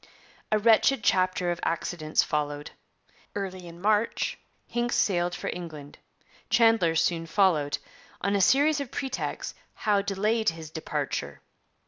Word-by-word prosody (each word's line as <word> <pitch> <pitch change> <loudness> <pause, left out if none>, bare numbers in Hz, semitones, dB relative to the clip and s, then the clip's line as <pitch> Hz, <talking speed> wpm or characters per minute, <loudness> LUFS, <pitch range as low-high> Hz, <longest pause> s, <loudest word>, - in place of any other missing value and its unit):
A 215 - +4
wretched 225 +3 +4
chapter 185 -1 +2
of 170 - -3
accidents 165 -2 0
followed. 145 -1 -2 0.6
Early 185 -3 -4
in 170 0 -11
March 210 +3 +1 0.3
Hincks 240 0 -1
sailed 180 -7 +1
for - - -3
England; 155 -5 -9 0.5
Chandler 225 -8 +4
soon 165 0 +1
followed; 160 -6 +2 0.4
on 200 +2 0
a 200 - +2
series 285 +8 +4
of 280 -3 -4
pretexts 265 0 -4 0.2
Howe 205 -2 +2
delayed 210 +3 +1
his 160 -1 -8
departure. 160 -1 -3
185 Hz, 125 wpm, -27 LUFS, 165-220 Hz, 0.6 s, A